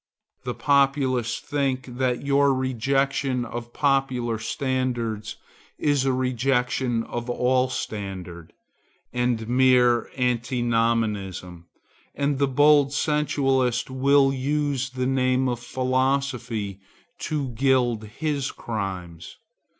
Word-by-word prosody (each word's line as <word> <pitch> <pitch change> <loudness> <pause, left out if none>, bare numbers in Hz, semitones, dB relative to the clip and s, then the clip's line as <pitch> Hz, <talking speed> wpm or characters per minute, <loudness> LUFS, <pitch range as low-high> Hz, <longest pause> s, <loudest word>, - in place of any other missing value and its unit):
The 125 - -3
populace 135 -4 +2
think 135 -3 -2
that 125 +1 -2
your 140 -1 +3
rejection 130 0 0
of 120 +1 -7
popular 130 -5 0
standards 120 -3 -2 0.4
is 145 -3 +1
a 135 - +2
rejection 125 -1 0
of 120 +1 -5
all 125 +1 +2
standard, 95 -8 -6 0.6
and 120 -2 0
mere 125 -1 +4
antinomianism; 115 -7 -1 0.5
and 140 -1 0
the 140 - +3
bold 145 +1 +4
sensualist 135 -5 +1
will 135 +1 +3
use 140 -1 -1
the 130 0 -3
name 130 0 +1
of 120 -1 -2
philosophy 130 -5 -1 0.4
to 150 -4 -2
gild 120 -2 +1
his 140 +5 -2
crimes. 95 -6 -6
130 Hz, 95 wpm, -24 LUFS, 120-135 Hz, 0.6 s, mere